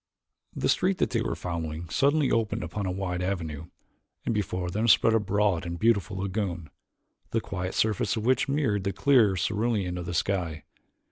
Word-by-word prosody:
The - - 0
street 185 +1 +2
that - - 0
they 115 - +1
were - - -2
following 85 -1 -4
suddenly 140 - +2
opened 115 -1 0
upon 100 -3 -3
a - - -1
wide 90 -1 -3
avenue, 85 -5 -3 0.6
and - - 0
before 90 -4 -2
them 110 +5 0
spread 115 +1 +5
a 115 - +4
broad 100 -3 +1
and 85 0 -4
beautiful 105 -1 +1
lagoon, 95 -5 -3 0.6
the 115 - +1
quiet 90 -4 -4
surface 110 -2 +1
of 110 -1 -3
which 130 +2 +2
mirrored 135 -9 +1
the 100 -1 -1
clear 120 -9 +4
cerulean 100 -1 -1
of 85 - -6
the 85 - -3
sky. 85 -5 -1
100 Hz, 180 wpm, -27 LUFS, 90-115 Hz, 0.6 s, spread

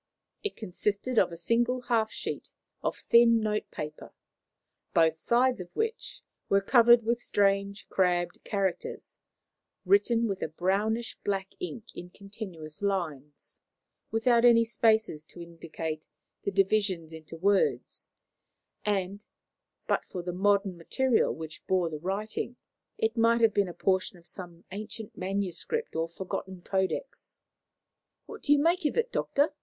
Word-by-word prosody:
It 415 - -3
consisted 210 +4 -1
of - - +3
a 170 - -7
single 240 +7 +1
half 230 -3 +1
sheet - - -5 0.3
of - - -1
thin 235 -1 +7
notepaper, 210 -8 -4 0.8
both 160 -1 +4
sides 245 +1 +2
of 175 - -9
which 450 +1 -3 0.3
were 195 - +5
covered 235 +3 +6
with 235 +2 0
strange, 200 -1 +1
crabbed 175 -2 0
characters, 195 -3 -3 0.7
written 235 - +4
with 195 -2 -3
a - - 0
brownish 200 +8 -1
black 195 -1 -1
ink 260 - -7
in 175 - -8
continuous 190 -6 -9
lines, 155 -8 -3 0.5
without 235 +1 +3
any 235 -1 +7
spaces 220 -8 +2
to 175 - -11
indicate 165 -2 -6 0.4
the - - +2
divisions 195 -4 +1
into 160 +1 -9
words; 195 +3 +1 0.7
and, 200 0 -1 0.6
but - - +1
for 180 - -6
the 180 0 -3
modern 200 0 +2
material 255 +8 +2
which 160 -1 -7
bore 180 -3 +1
the 155 - -5
writing, 205 +7 -3 0.4
it 220 +2 0
might 230 +1 +4
have 225 -2 +5
been 200 -2 +2
a - - -7
portion 185 -1 0
of 170 - -19
some 175 -2 -10
ancient 215 +2 -7
manuscript 195 - -3
or 165 +1 -1
forgotten 185 +1 -6
codex. 190 - -3 0.9
"What 440 -1 -10
do 290 - 0
you 290 - +7
make 335 +5 +2
of 295 - 0
it, 470 +1 +1
Doctor?" 290 +2 +1
200 Hz, 140 wpm, -29 LUFS, 175-230 Hz, 0.9 s, thin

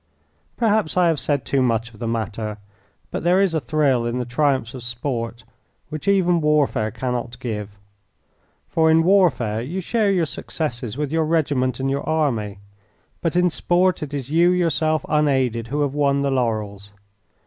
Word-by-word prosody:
Perhaps 215 -7 +1
I 175 -2 +5
have 160 -3 +1
said 145 -3 -1
too 135 - +1
much 115 -1 0
of 105 - -16
the 120 - -3
matter, 110 -1 -3 0.5
but - - -3
there 180 +2 +4
is 195 -4 +2
a 160 - +1
thrill 135 -2 +1
in 120 +1 -2
the 125 - -2
triumphs 130 -1 0
of 130 - -7
sport 120 -1 -4 0.5
which 155 +4 -7
even 180 -4 +3
warfare 150 -8 +2
cannot 120 0 -4
give, 105 -5 -5 0.9
for 160 -1 +2
in 160 +1 +5
warfare 165 - +3
you 160 +10 -4
share 210 +3 +1
your 180 -4 +2
successes 125 -7 -4
with 150 -1 -2
your 160 0 +1
regiment 140 -6 0
and 135 +1 0
your 140 - -1
army, 115 -10 0 0.6
but 165 0 -1
in 180 0 +3
sport 180 +2 +1
it 150 -2 -5
is 140 -1 -5
you 170 +2 +4
yourself 165 -3 +1
unaided 130 -6 +1
who 145 +5 -2
have 140 -2 0
won 140 -1 +1
the 140 - 0
laurels. 105 -5 -2
140 Hz, 170 wpm, -22 LUFS, 120-160 Hz, 0.9 s, I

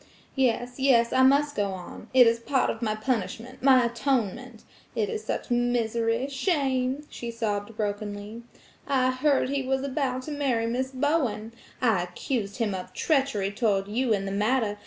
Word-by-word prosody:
"Yes, 245 -1 0
yes, 240 -4 +4
I 260 - +4
must 285 +2 +4
go 200 -2 0
on. 180 -2 -9
It 255 -1 +7
is 230 0 +3
part 260 +2 +1
of - - -8
my 215 -2 0
punishment–my 255 +2 +1
atonement! 240 -1 -2 0.3
It 210 -3 0
is 215 - -4
such 220 - -4
misery, 235 0 +1
shame!" 270 -2 0
she 235 - -7
sobbed 220 -2 -3
brokenly. 205 +1 -4 0.5
"I 255 -2 +2
heard 265 0 +1
he 280 0 0
was 265 0 -1
about 260 -2 -2
to 305 - -6
marry 265 -6 0
Miss 250 +3 -1
Bowen. 260 -5 -1 0.3
I 220 -7 +3
accused 200 +4 -3
him 225 -5 0
of 185 -1 -6
treachery 270 -10 +1
toward 205 -3 0
you 235 +4 0
in 200 -2 +1
the 195 - -3
matter. 210 +1 0
240 Hz, 160 wpm, -26 LUFS, 215-265 Hz, 0.5 s, It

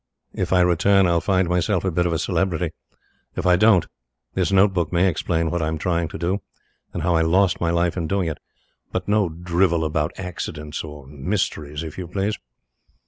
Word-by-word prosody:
If - - -2
I 90 -1 +5
return, 95 +3 +4
I'll 85 -1 +2
find 95 -2 +2
myself 90 +2 0
a 95 - +1
bit 90 +1 +1
of - - -1
a 85 - +1
celebrity. 85 -1 -1 0.6
If 90 - -3
I 90 0 +5
don't 100 -2 +5 0.5
this - - 0
note 95 +1 +4
book 85 -4 -1
may 90 +2 +3
explain 80 -1 0
what 85 -1 -1
I 80 - 0
am 80 0 -2
trying 85 0 0
to - - -7
do, 90 +4 -1 0.5
and - - -4
how 90 0 +2
I 80 - +3
lost 95 +3 +2
my 85 - +1
life 85 0 +1
in 85 -3 -2
doing 95 -1 0
it. 80 - -4 0.5
But - - -3
no 105 -3 +2
drivel 85 0 +1
about 75 -1 -1
accidents 80 -4 -5
or 75 -3 -9
mysteries, 75 0 -3
if 80 +2 -7
YOU 90 - -5
please. 100 +4 -2
85 Hz, 200 wpm, -22 LUFS, 80-95 Hz, 0.6 s, I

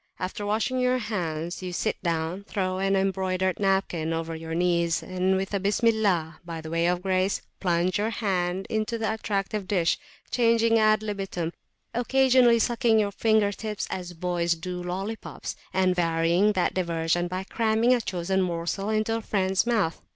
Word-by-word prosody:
After 205 +3 -4
washing 225 +5 0
your 250 0 +2
hands, 175 -7 -3
you 185 -1 -4
sit 215 +5 -2
down, 170 +1 -2
throw 185 -2 -2
an 195 0 +2
embroidered 190 -1 0
napkin 190 -5 0
over 165 0 -3
your 160 0 -5
knees, 170 -1 +1
and 185 +1 0
with 195 +2 -3
a 200 - +1
Bismillah, 200 -5 +1
by 165 -1 -6
way 165 +2 0
of 180 0 0
grace, 190 0 +1 0.2
plunge 175 +1 +1
your 215 +2 +1
hand 190 -4 -1
into 220 +1 -1
the 220 -1 -1
attractive 205 -2 -2
dish, 175 -4 +1 0.3
changing 230 -1 +3
ad 215 0 +4
libitum, 195 -5 -3 0.4
occasionally 250 0 +4
sucking 235 0 +2
your 205 -2 +2
finger 215 0 +2
tips 210 +1 -4
as 180 -1 -5
boys 175 0 0
do 180 +2 -5
lollipops, 195 +5 -5 0.2
and 185 -1 +2
varying 170 +4 +2
that 185 -3 +1
diversion 170 -1 0
by 185 +1 -3
cramming 225 +3 +2
a 245 - +2
chosen 190 -1 -1
morsel 180 +3 -2
into 220 +1 +1
a - - -5
friends 190 0 0
mouth. 210 -9 +1
190 Hz, 160 wpm, -26 LUFS, 175-215 Hz, 0.4 s, ad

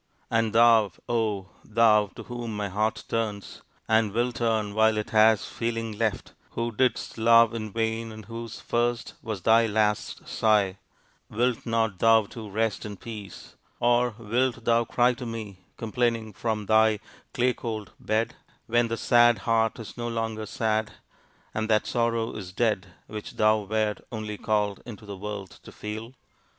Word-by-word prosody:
And 115 -1 +2
thou, 115 -3 +6 0.2
oh! 105 -5 -1
thou, 110 -2 +4
to - - -8
whom 120 -3 -5
my 105 -1 -2
heart 105 +3 -1
turns, 105 -3 -3 0.3
and 110 -1 +3
will 120 +2 +1
turn 110 -4 0
while 110 0 +3
it 105 - -3
has 110 -1 +5
feeling 115 -2 -3
left, 110 -2 -2 0.2
who 115 0 -2
didst 120 0 0
love 115 0 +6
in 110 -2 -4
vain, 115 +1 -2
and 110 -1 -10
whose 115 +1 -7
first 120 0 -1
was 105 -5 -5
thy 115 +1 +5
last 105 -1 0
sigh, 105 -4 +2 0.5
wilt 120 +2 0
not 115 -4 0
thou 115 -1 +5
too 110 +1 -9
rest 110 +1 -1
in 105 -2 -7
peace 105 -3 -9 0.2
(or 120 -1 +2
wilt 120 +1 -1
thou 115 0 +3
cry 120 +2 +3
to 125 +1 -7
me 110 -4 -6 0.2
complaining 115 -1 -1
from 110 0 -2
thy 110 0 +4 0.3
clay 125 +1 +2
cold 110 -5 -5
bed) 110 +2 0 0.3
when 120 +1 +2
that 115 0 -3
sad 120 -1 +5
heart 115 -1 +2
is 115 0 -9
no 120 0 -3
longer 110 -2 -3
sad, 110 -1 -1 0.6
and 110 0 -2
that 110 -1 +3
sorrow 115 -1 0
is 95 -4 -7
dead 105 -2 0 0.2
which 105 -1 -7
thou 110 0 +4
wert 105 +1 -1
only 110 -2 -4
called 105 -2 0
into 110 -3 -10
the 100 -1 -7
world 100 -1 -6
to - - -12
feel! 110 +3 -7
110 Hz, 160 wpm, -26 LUFS, 105-115 Hz, 0.6 s, thou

